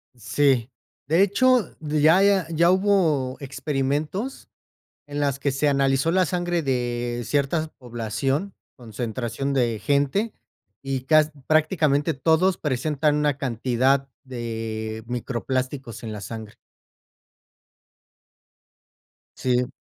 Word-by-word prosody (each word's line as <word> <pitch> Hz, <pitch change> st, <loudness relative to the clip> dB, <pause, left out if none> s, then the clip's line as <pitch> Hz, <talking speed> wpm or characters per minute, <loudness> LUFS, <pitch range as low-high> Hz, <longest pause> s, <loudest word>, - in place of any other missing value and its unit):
Sí, 125 Hz, +2 st, +1 dB, 0.4 s
de 165 Hz, +5 st, +3 dB
hecho, 245 Hz, +1 st, +3 dB
ya 155 Hz, +4 st, +3 dB
ya 195 Hz, -4 st, +3 dB
ya 170 Hz, +1 st, +3 dB
hubo 175 Hz, -10 st, +2 dB
experimentos 145 Hz, -, -3 dB, 0.6 s
en 145 Hz, 0 st, -3 dB
las 140 Hz, -1 st, 0 dB
que 140 Hz, 0 st, 0 dB
se 145 Hz, +2 st, +1 dB
analizó 135 Hz, +3 st, +2 dB
la 185 Hz, 0 st, +3 dB
sangre 175 Hz, 0 st, -1 dB
de 120 Hz, -2 st, -1 dB
ciertas 150 Hz, +3 st, 0 dB
población, 130 Hz, -, -2 dB, 0.2 s
concentración 120 Hz, +3 st, -4 dB
de 120 Hz, -5 st, +1 dB
gente, 145 Hz, +11 st, +1 dB, 0.5 s
y 135 Hz, -1 st, -2 dB
cas 155 Hz, 0 st, +4 dB, 0.2 s
prácticamente 155 Hz, -1 st, +2 dB
todos 165 Hz, +6 st, +2 dB
presentan 150 Hz, +2 st, 0 dB
una 150 Hz, -2 st, +1 dB
cantidad 130 Hz, +2 st, +1 dB, 0.2 s
de 110 Hz, -3 st, -5 dB
microplásticos 125 Hz, 0 st, -3 dB
en 110 Hz, -, -5 dB
la 105 Hz, -, -6 dB
sangre. 110 Hz, +1 st, -8 dB, 2.8 s
Sí. 125 Hz, +1 st, 0 dB
140 Hz, 105 wpm, -24 LUFS, 125-155 Hz, 2.8 s, cas